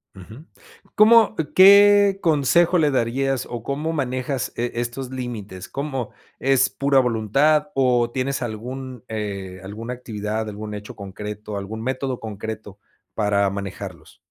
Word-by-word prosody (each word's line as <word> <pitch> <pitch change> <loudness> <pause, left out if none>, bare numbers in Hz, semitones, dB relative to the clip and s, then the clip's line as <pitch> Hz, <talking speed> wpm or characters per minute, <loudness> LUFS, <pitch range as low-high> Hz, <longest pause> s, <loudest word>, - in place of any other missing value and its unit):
Ujú. 110 - -12 0.5
¿Cómo 220 +1 +6 0.2
qué 200 +1 +7
consejo 170 +3 +3
le 150 -4 +3
darías, 130 +1 0
o 120 -2 -6
cómo 150 +5 -2
manejas 130 -2 -2
e 120 +1 -2
estos 120 +2 -4
límites? 115 -8 -6
¿Cómo 135 -4 -4 0.3
es 135 -5 +3
pura 135 +6 +2
voluntad, 135 +6 +2
o, 125 -3 +2
tienes 130 +1 -2
algún 125 +2 -6
eh, 100 -4 -5
alguna 110 +5 -6
actividad, 110 -2 -4
algún 105 0 -7
hecho 105 0 -8
concreto, 105 +1 -7
algún 105 +3 -6
método 130 +1 -3
concreto 110 -1 -7 0.4
para 100 -2 +1
manejarlos? 100 -1 -7
120 Hz, 125 wpm, -22 LUFS, 105-135 Hz, 0.5 s, qué